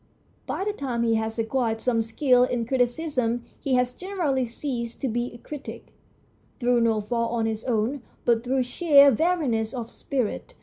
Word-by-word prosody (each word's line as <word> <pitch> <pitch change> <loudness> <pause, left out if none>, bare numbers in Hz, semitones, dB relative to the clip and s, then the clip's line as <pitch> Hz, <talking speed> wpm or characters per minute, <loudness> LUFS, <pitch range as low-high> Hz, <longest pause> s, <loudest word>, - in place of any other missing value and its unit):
By - - -2
the 420 - -1
time 250 - -2
he 230 -1 +2
has 220 0 -1
acquired 225 0 0
some 230 -1 +1
skill 250 +3 +3
in 245 -2 0
criticism 245 -1 0 0.2
he 270 -4 0
has 250 0 +1
generally 335 -9 -1
ceased 235 -1 -5
to 270 - 0
be 240 +1 -2
a 240 - -11
critic, 285 +4 -9 0.7
through 245 -1 +3
no 225 -2 +2
fault 230 +2 -1
of 225 - +1
his 220 0 -2
own, 245 +3 0 0.2
but 230 -1 +3
through 260 +1 +1
sheer 280 +1 +6
weariness 260 -7 0
of 235 -2 -5
spirit. 275 - -3
245 Hz, 170 wpm, -25 LUFS, 230-275 Hz, 0.7 s, sheer